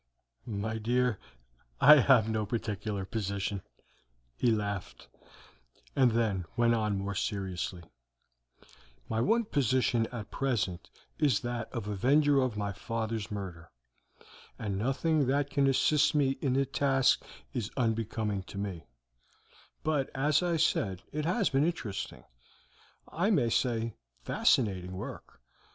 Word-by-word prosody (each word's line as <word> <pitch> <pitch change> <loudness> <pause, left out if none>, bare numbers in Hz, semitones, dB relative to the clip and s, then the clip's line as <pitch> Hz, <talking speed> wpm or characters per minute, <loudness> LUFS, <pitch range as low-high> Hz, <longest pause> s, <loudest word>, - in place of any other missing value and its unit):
"My 110 +1 -3
dear, 120 0 +1 0.6
I 150 +1 +9
have 125 -5 +5
no 110 -1 0
particular 105 -2 -3
position," 100 -1 -3 0.7
he 120 - +2
laughed, 100 -3 -3 0.9
and 130 -4 +4
then 105 -6 0
went 120 0 +4
on 105 -3 0
more 100 +1 -3
seriously: 95 -3 -3 1.2
"My 110 0 -1
one 230 - +2
position 130 - +1
at 115 -4 -8
present 110 -10 -1 0.3
is 145 -8 +3
that 120 -2 -4
of 115 -5 -4
avenger 140 +7 +3
of 125 -5 -1
my 100 -1 -2
father's 110 +1 -3
murder, 90 -5 -6 0.9
and 100 -2 -3
nothing 135 +7 +1
that 140 +1 +1
can 140 -1 +2
assist 145 +3 +3
me 140 -2 +3
in 135 -3 +1
the 135 +1 +2
task 135 0 +2 0.3
is 110 -3 -2
unbecoming 110 -4 -1
to 100 - -10
me; 100 -5 -5 1.0
but, 150 -4 0
as 145 +4 +2
I 175 -2 +1
said, 95 - 0
it 150 0 -2
has 185 +4 +1
been 135 +1 +3
interesting, 150 - -3 0.8
I 180 +6 0
may 185 - +3
almost 115 - +2
say 115 -3 -2 0.3
fascinating, 95 -6 +1
work. 90 - -8
115 Hz, 130 wpm, -30 LUFS, 100-135 Hz, 1.2 s, I